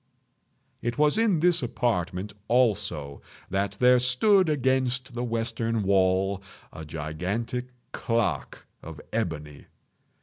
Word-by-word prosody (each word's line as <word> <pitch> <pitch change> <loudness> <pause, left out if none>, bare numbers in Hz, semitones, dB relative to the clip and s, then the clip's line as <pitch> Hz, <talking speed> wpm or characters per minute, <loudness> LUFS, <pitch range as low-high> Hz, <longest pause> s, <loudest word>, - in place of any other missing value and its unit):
It 120 +2 -3
was 150 0 +4
in 205 -8 +2
this 175 -1 +4
apartment, 105 -5 -2
also, 105 - 0 0.3
that 100 +1 0
there 125 0 +6
stood 160 - +4
against 130 -3 0
the 120 +1 -3
western 115 -1 -1
wall, 95 0 +2 0.3
a 80 - -8
gigantic 90 +11 -4 0.3
clock 115 -1 -2 0.2
of 80 -2 -9
ebony. 75 -9 -4
115 Hz, 105 wpm, -26 LUFS, 95-125 Hz, 0.3 s, there